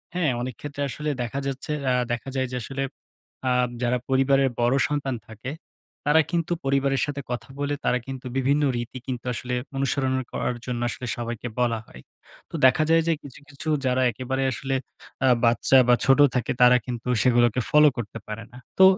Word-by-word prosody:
হ্যাঁ, 165 -7 +2
অনেকক্ষেত্রে 140 +3 -6
আসলে 150 +3 -3
দেখা 120 +3 -3
যাচ্ছে 135 +2 -4 0.2
আ 125 - +3 0.2
দেখা 120 +3 -3
যায় 130 -1 0
যে 125 - -4
আসলে 135 +3 -3 0.7
আ - - +2 0.3
যারা 125 +1 +2
পরিবারের 135 0 +3
বড় 120 +2 +3
সন্তান 140 -3 -2
থাকে, 110 +3 -8 0.6
তারা 150 +2 +5
কিন্তু 170 0 -1
পরিবারের 135 -1 +2
সাথে 145 -1 -4
কথা 125 - -4
বলে 145 0 -1
তারা 125 - +3
কিন্তু 135 -1 -7
বিভিন্ন 140 +3 +2
রীতি 120 +2 -5
কিন্তু 125 -2 -4
আসলে 125 +1 -4 0.2
অনুসরণ 135 -1 0 0.2
করার 125 - -2
জন্য 120 -1 -3
আসলে 125 - -5
সবাইকে 120 0 -4
বলা 120 -2 +1
হয়। 60 - -13 0.5
তো, - - -7
দেখা 130 +4 +5
যায় 165 0 +5
যে, 165 - +4
কিছু, 135 -3 -11
কিছু 145 +2 -8 0.2
যারা 130 0 +2
একেবারে 130 +3 -2
আসলে 135 +2 -2 0.5
আ - - +5 0.2
বাচ্চা 120 +3 +4
বা, 125 - +6
ছোট 135 +1 +5 0.2
থাকে, 125 -2 0
তারা 125 0 +8
কিন্তু 125 -1 -5 0.2
সেগুলোকে 120 -1 +3
ফলো 150 0 +7
করতে 115 -1 -5
পারে 110 +1 -6
না। 125 - -13 0.2
তো, - - +9
130 Hz, 180 wpm, -25 LUFS, 120-140 Hz, 0.7 s, তো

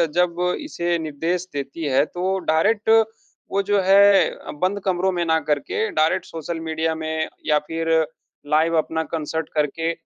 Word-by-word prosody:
जब 175 -1 +1 0.2
इसे 175 - -1
निर्देश 165 +4 -2
देती 140 +3 -5
है 135 +2 +5
तो 185 +4 -2
डायरेक्ट 205 +8 +2 0.6
वो 200 - +2
जो 205 -1 +4
है 195 +1 +5 0.3
बंद 190 +2 +1
कमरों 190 0 +1
में 175 -2 -1
ना 160 -1 +2
करके 410 - 0
डायरेक्ट 160 +4 +1
सोशल 165 +1 -5
मीडिया 160 0 -2
में 160 0 -2 0.2
या 150 -1 +3
फ़िर 165 0 -3 0.7
लाइव 165 +1 +3
अपना 160 +1 0
कॉन्सर्ट 160 0 -3
करके 155 +2 0
165 Hz, 150 wpm, -22 LUFS, 160-185 Hz, 0.7 s, है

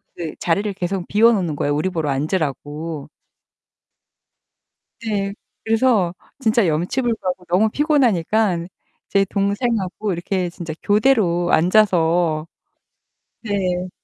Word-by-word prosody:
그 165 -3 -5
자리를 200 +5 0
계속 185 -1 -3
비워 225 +3 +5
놓는 180 -9 0
거예요. 145 0 0
우리 170 +6 0
보러 160 -5 -2
앉으라고. 150 0 -3 1.9
네. 200 -3 -2 0.3
그래서 220 -5 +2 0.3
진짜 225 -5 +2
염치불고하고 185 +3 -1
너무 185 +6 +2
피곤하니까 220 - +1 0.4
제 195 0 +3
동생하고 200 0 -1
이렇게 180 +1 -2
진짜 170 -2 -7
교대로 205 -6 +2
앉아서 170 -4 +3 0.9
네. 185 -4 -2
185 Hz, 245 characters per minute, -20 LUFS, 170-215 Hz, 1.9 s, 비워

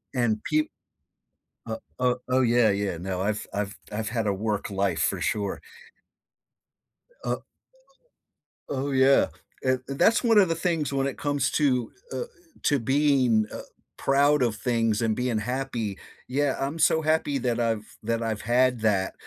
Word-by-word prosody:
And 115 -4 +1
peep 155 0 +1 1.0
o 110 0 -3 0.2
o 125 -1 +2
oh, 130 +1 +3
yeah 120 -2 +4
yeah 100 -3 -1
no 90 +1 -3
I've 105 +2 -1
I've 105 0 -3 0.2
I've 110 +1 -2
had 115 -2 -1
a 100 - +1
work 105 0 -2
life 95 -3 0
for - - -5
sure. 105 -2 -2 1.6
Oh - - -2 1.3
Oh 140 0 -2
yeah, 135 +1 +5 0.4
eh 130 0 +2
that's 220 - +3
one 225 -2 +4
of 190 -4 +6
the 165 - +1
things 165 -4 -1
when 135 0 +1
it 135 - -5
comes 145 -1 0
to, 130 -5 +1 0.2
uh - - -2
eh, - - 0 0.4
to 145 -3 +3
being, 130 -4 +3
uh, - - -5 0.4
proud 140 +1 +3
of 120 -3 +1
things 115 -2 0
and 110 -2 +1
being 125 -3 0
happy. 120 -3 -3 0.3
Yeah, 140 +1 +1
I'm 140 +4 -2
so 160 - +4
happy 155 -2 +1
that 120 -2 -1
I've 115 -2 -2
that 115 +1 -1
I've 110 -2 -2
had 125 +2 +2
that 100 -4 +1
125 Hz, 160 wpm, -26 LUFS, 110-140 Hz, 1.6 s, of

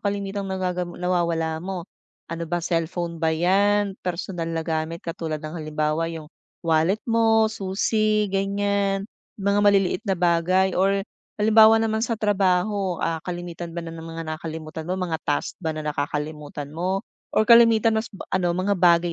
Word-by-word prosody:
kalimitang 200 -1 -3
nagagam 180 -2 -3
nawawala 170 -3 0
mo? 185 -1 -5 0.5
Ano 165 -1 -4
ba, 175 -1 -1
cellphone 170 0 -2
ba 160 - +2
'yan? 195 +5 +2
Personal 175 -1 -3
na 165 -1 -2
gamit 160 +1 -3
katulad 165 -2 -3
ng, 155 +1 -7
halimbawa 155 0 -1
'yong 160 -1 -8 0.3
wallet 165 +6 +2
mo, 225 -1 +3
susi, 215 +2 +1
ganiyan? 200 0 0 0.3
Mga 200 0 +1
maliliit 200 -2 +3
na 190 - +2
bagay 180 +2 +2
or 195 +2 +2 0.3
halimbawa 220 +1 +6
naman 220 -1 0
sa 230 0 -1
trabaho, 195 -2 +1
ah, 165 -1 -1
kalamitan 175 0 -6
ba 170 - -3
na 165 - -7
ng 165 0 -8
mga 165 0 -5
nakakalimutan 160 0 -6
mo, 185 - -1
mga 175 -4 -2
task 145 - -1
ba 160 -3 -3
na 155 - -4
nakakalimutan 150 0 -4
mo? 185 +6 -2 0.3
Or 215 - +5
kalimitan 230 -1 +6
mas 220 - -7
b 195 - -10
ano, 185 -2 +2
mga 190 +2 +1
bagay 170 -1 +4
180 Hz, 155 wpm, -24 LUFS, 165-200 Hz, 0.5 s, halimbawa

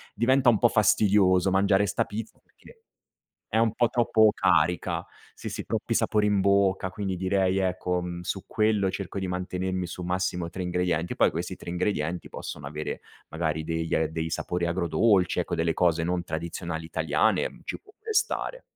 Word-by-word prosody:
diventa 125 +3 +4
un 110 - +4
po' 120 - +4
fastidioso 95 -3 +3
mangiare 100 +1 +3
'sta 100 - 0
pizza 110 +2 -6
perché 470 -1 -20 0.7
è 110 - +2
un 115 -1 +2
po' 120 0 +2
troppo 110 -3 +4
carica. 85 +2 +1 0.3
Sì, - - -7
sì, - - -5
troppi - - -3
sapori 105 -1 +2
in 105 -1 +2
bocca, 95 -1 +2
quindi 95 -1 -3
direi, 95 +1 +1
ecco, 90 -1 0
mhmm, 90 0 -5
su 95 +2 -4
quello 105 -3 +1
cerco 100 0 -5
di 95 - -2
mantenermi 90 0 -3
su 90 - -7
massimo 90 -1 -1
3 95 - -5
ingredienti. 90 -1 -1
Poi, - - +3
questi 90 +2 -4
3 - - -12
ingredienti 90 -2 -2
possono 70 - -7
avere, 75 +2 -5 0.3
magari, 80 -1 -2
degli 80 0 -1
dei 80 0 -1
sapori 85 +1 -2
agrodolci, 90 +3 +2
ecco, 85 0 -2
delle 80 0 0
cose 85 -2 +2
non 90 +1 -1
tradizionali 85 0 -5
italiane, 80 - +1
mhmm, - - -17
ci - - -5
può 415 - -20
pure 440 +1 -5
stare. - - -1
90 Hz, 175 wpm, -26 LUFS, 85-100 Hz, 0.7 s, diventa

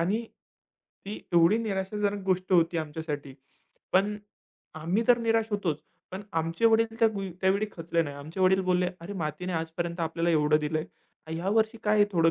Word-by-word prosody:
आणि 200 +7 +1 0.8
ती 205 - -5
एवढी 170 +5 +5
निराशाजनक 205 -1 -2
गोष्ट 185 0 0
होती 170 -1 +4
आमच्यासाठी, 150 -3 -5 0.6
पण 200 +3 +3 0.7
आम्ही 180 +8 +1
तर 245 -1 +6
निराश 225 -1 +1
होतोच. 185 -8 -1 0.3
पण 190 +2 -6 0.2
आमचे 165 +7 -3
वडील 225 0 +2
त्या 225 - +5
गुई 195 -1 -4
त्यावेळी 195 +3 +2
खचले 165 0 -1
नाही. 145 -3 -6
आमचे 155 +6 -7
वडील 190 +1 +4
बोलले, 180 0 +2
अरे 170 +4 -7
मातीने 155 +4 -3
आजपर्यंत 170 +1 -3
आपल्याला 165 +1 0
एवढं 150 -1 +4
दिलंय. 155 +1 -1 0.4
आणि 160 +1 -4
ह्या 175 +3 -2
वर्षी 220 +1 +1
काय 210 0 +3
आहे 205 - +6
थोडं 165 -1 +4
180 Hz, 170 wpm, -28 LUFS, 165-205 Hz, 0.8 s, तर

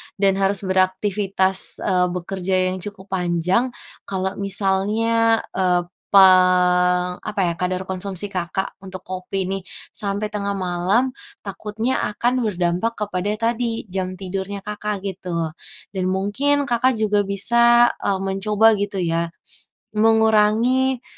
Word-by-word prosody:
dan 195 -1 +1
harus 195 +1 0
beraktivitas, 190 0 +2
eee, 180 -2 +2
bekerja 185 +1 -3 0.2
yang 185 - -5
cukup 200 -2 -9
panjang. 180 +7 +1 0.4
Kalau 190 -1 -2
misalnya, 210 +4 +1
eee, 180 -1 +1 0.2
pang 180 -1 +4
apa 210 -2 -3
ya - - -3
kadar 185 +1 -1
konsumsi 190 +1 -4
Kakak 185 +1 -3
untuk 185 -1 -9
kopi 185 +1 -4
nih 195 +1 -3 0.3
sampai 205 +1 -3
tengah 200 -1 -2
malam, 190 +7 0 0.3
takutnya 215 +5 -3 0.2
akan 245 +4 +1
berdampak 180 +4 -1
kepada 185 -1 -3 0.2
tadi 230 -1 -3
jam 185 0 -3
tidurnya 195 +1 -5
Kakak 210 -1 -4
gitu, 175 -4 -4 0.4
dan 190 -2 -3
mungkin 205 +10 0
Kakak 250 +1 +2
juga 210 -1 +2
bisa, 235 +4 +4
eee, 195 -1 -1
mencoba 210 +3 +3
gitu 200 -1 -2
ya, 170 0 -1 0.6
mengurangi 225 +4 +3
195 Hz, 120 wpm, -21 LUFS, 185-215 Hz, 0.6 s, pang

